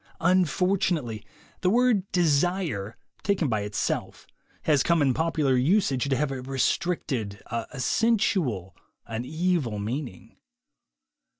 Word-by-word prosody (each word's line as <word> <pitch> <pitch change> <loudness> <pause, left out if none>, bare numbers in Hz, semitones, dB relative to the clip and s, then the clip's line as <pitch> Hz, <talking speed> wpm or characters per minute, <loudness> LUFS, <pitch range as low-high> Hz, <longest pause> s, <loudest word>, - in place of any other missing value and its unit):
Unfortunately, 175 - +1 0.4
the 180 - +2
word 230 -3 +2
"desire,'' 160 - +1 0.2
taken 190 -7 +1
by 110 -3 0
it 105 0 -6
self, - - -2 0.4
has 150 -4 +3
come 170 +3 +3
in 140 -3 +3
popular 155 -3 +1
usage 140 - +2
to 135 - +2
have 140 +1 0
a 130 -1 -4
restricted, 130 - -1
a 115 +4 -4
sensual, 140 - +1 0.3
an 115 +2 -4
evil 160 -7 0
meaning. 115 - -5
145 Hz, 115 wpm, -26 LUFS, 120-180 Hz, 0.4 s, has